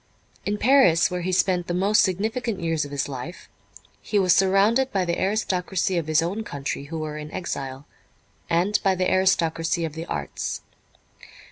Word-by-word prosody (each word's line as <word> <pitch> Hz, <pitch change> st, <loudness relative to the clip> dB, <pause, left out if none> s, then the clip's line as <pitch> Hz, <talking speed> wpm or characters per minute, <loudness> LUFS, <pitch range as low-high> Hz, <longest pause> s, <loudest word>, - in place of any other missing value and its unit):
In 205 Hz, +1 st, 0 dB
Paris, 220 Hz, -11 st, +4 dB
where 180 Hz, 0 st, -2 dB
he 185 Hz, +2 st, -2 dB
spent 180 Hz, -1 st, +1 dB
the 175 Hz, -, -2 dB
most 200 Hz, +4 st, +3 dB
significant 220 Hz, +3 st, -1 dB
years 165 Hz, -3 st, -1 dB
of -, -, -8 dB
his 140 Hz, -1 st, -2 dB
life, 140 Hz, +5 st, -7 dB, 0.5 s
he 210 Hz, -, -1 dB
was 185 Hz, -3 st, +4 dB
surrounded 205 Hz, +7 st, +3 dB
by 190 Hz, -2 st, 0 dB
the 170 Hz, 0 st, -2 dB
aristocracy 190 Hz, -2 st, 0 dB
of 165 Hz, -3 st, -1 dB
his 155 Hz, +1 st, +3 dB
own 195 Hz, +6 st, -3 dB
country 140 Hz, -5 st, -5 dB
who 160 Hz, +3 st, -6 dB
were 155 Hz, -1 st, -4 dB
in 150 Hz, 0 st, -8 dB
exile, 135 Hz, -6 st, -5 dB, 0.6 s
and 180 Hz, +5 st, +2 dB
by 195 Hz, -1 st, +2 dB
the 185 Hz, 0 st, 0 dB
aristocracy 170 Hz, -3 st, +1 dB
of 160 Hz, -, -5 dB
the 165 Hz, +1 st, -6 dB
arts. 70 Hz, -3 st, -4 dB
180 Hz, 170 wpm, -24 LUFS, 160-195 Hz, 0.6 s, Paris